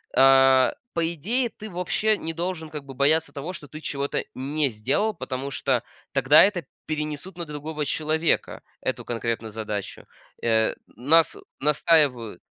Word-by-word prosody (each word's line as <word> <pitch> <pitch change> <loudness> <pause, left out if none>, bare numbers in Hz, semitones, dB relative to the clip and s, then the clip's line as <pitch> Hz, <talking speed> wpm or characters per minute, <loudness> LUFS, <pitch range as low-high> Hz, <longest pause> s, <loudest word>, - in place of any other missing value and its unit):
а, 135 0 +6 0.2
по 165 -1 +1
идее, 235 - 0
ты 215 0 -10
вообще 200 +4 0
не 165 0 -4
должен, 170 -1 -3
как 150 -2 -6
бы, 135 - -9
бояться 150 +4 +2
того, 155 +6 -5
что 145 -4 -10
ты 155 - -8
чего-то 140 -2 -2
не 145 +3 0
сделал, 135 - 0
потому 135 -4 -5
что 130 -3 0 0.3
тогда 140 +2 +6
это 185 -7 +1 0.2
перенесут 155 +3 -4
на 170 - -4
другого 150 0 -4
человека 155 +3 0 0.2
эту - - -3
конкретную 115 -1 -3
задачу. 105 -2 -5 0.4
Э, 110 -1 +2
нас 155 +7 +2 0.2
настаивают 140 - +2
150 Hz, 145 wpm, -25 LUFS, 130-165 Hz, 0.4 s, а